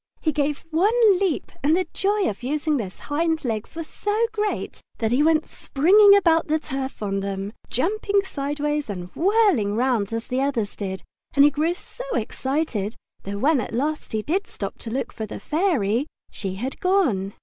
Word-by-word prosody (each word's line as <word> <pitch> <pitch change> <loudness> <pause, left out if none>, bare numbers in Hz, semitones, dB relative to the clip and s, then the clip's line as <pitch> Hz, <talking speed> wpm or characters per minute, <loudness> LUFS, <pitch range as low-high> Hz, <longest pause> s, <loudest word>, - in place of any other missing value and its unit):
He 310 - +1
gave 295 0 -1
one 410 +3 +4
leap 380 -6 -1
and 305 +4 +3
the 370 - +1
joy 405 0 +1
of 200 - -4
using 295 +3 0
those 195 -7 -6
hind 320 +1 -1
legs 220 +1 -3
was 330 -1 -4
so 420 +7 0
great 425 -1 -3 0.2
that 225 -1 0
he 255 +4 +3
went 315 0 +3
springing 400 +8 +5
about 330 -5 +3
the 310 0 +2
turf 270 -5 -5
on 195 -1 -1
them, 195 +1 -4 0.2
jumping 400 - +1
sideways 295 - -2
and 180 -3 -6
whirling 365 - +3
round 235 -4 +1
as 230 0 -3
the 255 +1 -1
others 245 -7 -1
did, 190 -2 -5 0.3
and 280 0 +7
he 295 - +5
grew 315 +5 0
so - - -10
excited 265 -7 -2 0.3
that 200 +1 -5
when 285 +2 +3
at - - -5
last 300 +5 -2
he 215 -1 -1
did 370 - -1
stop - - -6
to 230 - -7
look 260 +4 -3
for 220 - -5
the - - -7
Fairy 290 - +1 0.2
she 190 -3 -5
had 255 +7 -4
gone. 265 - +1
290 Hz, 185 wpm, -23 LUFS, 225-340 Hz, 0.3 s, and